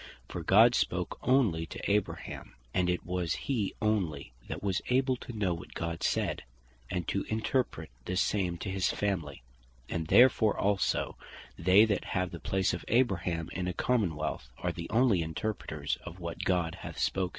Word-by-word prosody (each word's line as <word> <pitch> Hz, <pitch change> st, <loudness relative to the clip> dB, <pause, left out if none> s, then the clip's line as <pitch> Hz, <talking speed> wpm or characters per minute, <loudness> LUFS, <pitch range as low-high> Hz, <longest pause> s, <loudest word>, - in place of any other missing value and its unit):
For -, -, -5 dB
God -, -, +6 dB
spake -, -, -1 dB
onely 110 Hz, -12 st, +3 dB
to -, -, -4 dB
Abraham; 105 Hz, -1 st, -2 dB, 0.2 s
and 90 Hz, -1 st, +2 dB
it 90 Hz, -, -1 dB
was 90 Hz, -2 st, -1 dB
he 115 Hz, -8 st, -2 dB
onely, 90 Hz, -, 0 dB, 0.2 s
that -, -, -5 dB
was 95 Hz, -2 st, 0 dB
able 130 Hz, +1 st, +3 dB
to 120 Hz, -, -8 dB
know 95 Hz, -4 st, +1 dB
what 85 Hz, +2 st, -9 dB
God 85 Hz, 0 st, -3 dB
said, -, -, 0 dB, 0.5 s
and 90 Hz, -2 st, -2 dB
to 100 Hz, -, 0 dB
interpret 110 Hz, -, -1 dB
the 90 Hz, -, -2 dB
same 90 Hz, -3 st, +1 dB
to -, -, -2 dB
his 95 Hz, -2 st, +1 dB
family: 85 Hz, -11 st, -2 dB, 0.5 s
And 80 Hz, -2 st, -2 dB
therefore 120 Hz, -1 st, +5 dB
also, 100 Hz, -1 st, +1 dB, 0.4 s
they 95 Hz, +5 st, +6 dB
that 100 Hz, -4 st, -1 dB
have 90 Hz, -1 st, 0 dB
the 85 Hz, -, -7 dB
place 95 Hz, +2 st, 0 dB
of 85 Hz, -, -4 dB
Abraham 90 Hz, -9 st, +1 dB
in 90 Hz, -1 st, -2 dB
a 90 Hz, -, -1 dB
Common 105 Hz, -5 st, +1 dB
wealth, 70 Hz, -5 st, -4 dB
are -, -, -1 dB
the 85 Hz, -, -7 dB
onely 115 Hz, -5 st, +3 dB
Interpreters 80 Hz, -3 st, -3 dB
of 85 Hz, +2 st, -9 dB
what 85 Hz, -1 st, -5 dB
God 90 Hz, -3 st, +1 dB
hath -, -, -7 dB
spoken. 95 Hz, -1 st, 0 dB
90 Hz, 175 wpm, -30 LUFS, 85-105 Hz, 0.5 s, God